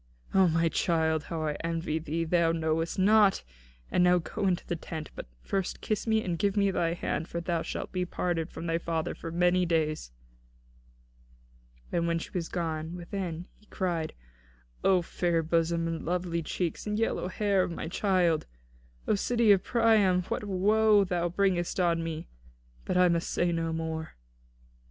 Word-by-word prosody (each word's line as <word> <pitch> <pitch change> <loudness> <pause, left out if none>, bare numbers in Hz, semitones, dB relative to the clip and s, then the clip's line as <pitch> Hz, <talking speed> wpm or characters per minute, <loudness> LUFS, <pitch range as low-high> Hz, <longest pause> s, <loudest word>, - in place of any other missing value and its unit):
"O 190 -1 +5
my 165 0 +2
child, 160 -2 +1
how 160 -1 -3
I 150 -1 0
envy 165 -1 -1
thee, 160 +1 -2
that 160 - -7
thou 170 -1 +4
knowest 165 0 -1
naught! 205 +1 +4 0.5
And 180 - +3
now 180 0 +5
go 195 +4 -2
into 180 -2 0
the 175 - -2
tent; 160 -1 -7
but - - -8 0.2
first 195 -2 -2
kiss 215 +1 -2
me, 220 0 +2
and 170 -3 -2
give 200 0 +1
me 200 -1 +3
thy 170 -2 0
hand, 165 -1 -2
for 170 - -4
thou 170 -1 -1
shalt - - -5
be 185 -1 -1
parted 175 -2 -2
from 165 - -7
thy 165 0 0
father 165 0 -2
for 165 - -7
many 180 +2 +3
days." 155 - 0 1.8
And 170 -1 0
when 170 0 +1
she 165 - -6
was 170 -3 -3
gone 160 -1 -3
within, 175 -1 -5
he 210 - -25
cried: 170 -5 -2 0.7
"O 185 -2 +4
fair 170 -1 0
bosom 165 +1 +1
and 165 -1 -2
very - - -9
lovely 175 -1 -1
cheeks 170 +4 -3
and 210 0 -1
yellow 225 -4 0
hair 200 0 +1
of - - 0
my 165 -2 -5
child! 175 -3 +1 0.6
O - - +3
city 230 +1 +3
of 195 -2 +4
Priam, 215 -6 +3
what - - -2
woe 210 +2 +4
thou 175 -2 -1
bringest 180 -1 0
on 170 -2 +2
me! 165 -1 -5 0.6
But - - 0
I 180 0 +6
must 170 -1 0
say 175 0 +1
no 165 -1 -1
more." 160 0 -4
175 Hz, 180 wpm, -29 LUFS, 165-190 Hz, 1.8 s, I